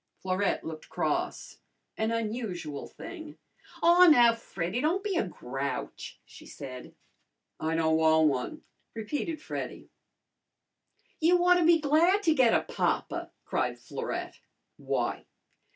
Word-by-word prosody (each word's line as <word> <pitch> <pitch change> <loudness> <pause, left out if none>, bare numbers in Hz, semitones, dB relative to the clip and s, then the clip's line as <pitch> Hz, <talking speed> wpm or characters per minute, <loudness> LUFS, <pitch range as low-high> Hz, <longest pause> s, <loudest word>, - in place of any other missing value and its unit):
Florette 190 +2 0
looked 160 -1 -8
cross - - -2 0.4
an 220 0 -1
unusual 210 - -3
thing. 315 -4 -10 0.5
"Aw, 350 +1 +7
now, 240 -7 +7
Freddy, 205 -1 -4
don't 345 +6 +1
be 410 -3 -1
a 220 - +1
grouch," 135 -4 -5
she - - -14
said. 130 -3 -9 0.6
"I 160 +1 -1
don' 160 -1 +2
wan' 160 0 +4
one," 130 -4 -2 0.3
repeated 295 +8 -3
Freddy. - - -6 1.3
"You 340 +3 +4
ought 360 0 +6
to 340 - +2
be 335 0 +6
glad 330 +7 +3
to 320 - +4
get 255 -6 +4
a - - +2
papa!" - - -2 0.2
cried - - -1
Florette. - - -5 0.4
"Why?" - - -2
230 Hz, 125 wpm, -29 LUFS, -, 1.3 s, Aw